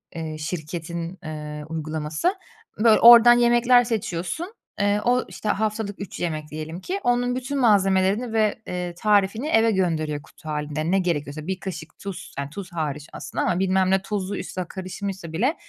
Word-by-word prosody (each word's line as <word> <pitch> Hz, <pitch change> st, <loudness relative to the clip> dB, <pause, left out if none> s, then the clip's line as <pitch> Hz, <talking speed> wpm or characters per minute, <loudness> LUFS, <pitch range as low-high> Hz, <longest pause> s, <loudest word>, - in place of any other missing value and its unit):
eee, 160 Hz, -1 st, -5 dB
şirketin, 170 Hz, +2 st, -5 dB
eee, 150 Hz, -1 st, -6 dB
uygulaması, 160 Hz, -, -2 dB, 0.4 s
böyle 220 Hz, 0 st, +5 dB
oradan 240 Hz, 0 st, +10 dB
yemekler 240 Hz, +1 st, +5 dB
seçiyorsun, 225 Hz, -, -3 dB, 0.3 s
eee, 205 Hz, +1 st, +2 dB
o 250 Hz, +1 st, +2 dB
işte 215 Hz, -, -5 dB
haftalık 215 Hz, -1 st, -1 dB
3 200 Hz, -, -7 dB
yemek 155 Hz, -3 st, -3 dB
diyelim 155 Hz, +3 st, -6 dB
ki, 390 Hz, +2 st, -3 dB
onun 245 Hz, 0 st, +1 dB
bütün 265 Hz, +2 st, -3 dB
malzemelerini 200 Hz, 0 st, +3 dB
ve, 220 Hz, 0 st, +1 dB
eee, 180 Hz, -1 st, -4 dB
tarifini 210 Hz, +4 st, +2 dB
eve 225 Hz, -7 st, +4 dB
gönderiyor 160 Hz, -6 st, 0 dB
kutu 155 Hz, -, -13 dB
hâlinde, 150 Hz, +2 st, -2 dB
ne 195 Hz, -, +3 dB
gerekiyorsa. 155 Hz, -3 st, -2 dB
1 190 Hz, 0 st, -2 dB
kaşık 170 Hz, -4 st, -7 dB
tuz, 195 Hz, -2 st, -7 dB
yani 140 Hz, 0 st, -3 dB
tuz 190 Hz, +3 st, -8 dB
hariç 150 Hz, -2 st, -3 dB
aslında -, -, -4 dB
ama 180 Hz, -, +1 dB
bilmem 190 Hz, 0 st, +2 dB
ne 190 Hz, 0 st, +3 dB
tuzu 200 Hz, 0 st, -3 dB
üstüne 185 Hz, -1 st, -4 dB
karışmışsa 190 Hz, -2 st, -6 dB
bile 250 Hz, -, +1 dB
190 Hz, 160 wpm, -24 LUFS, 160-220 Hz, 0.4 s, oradan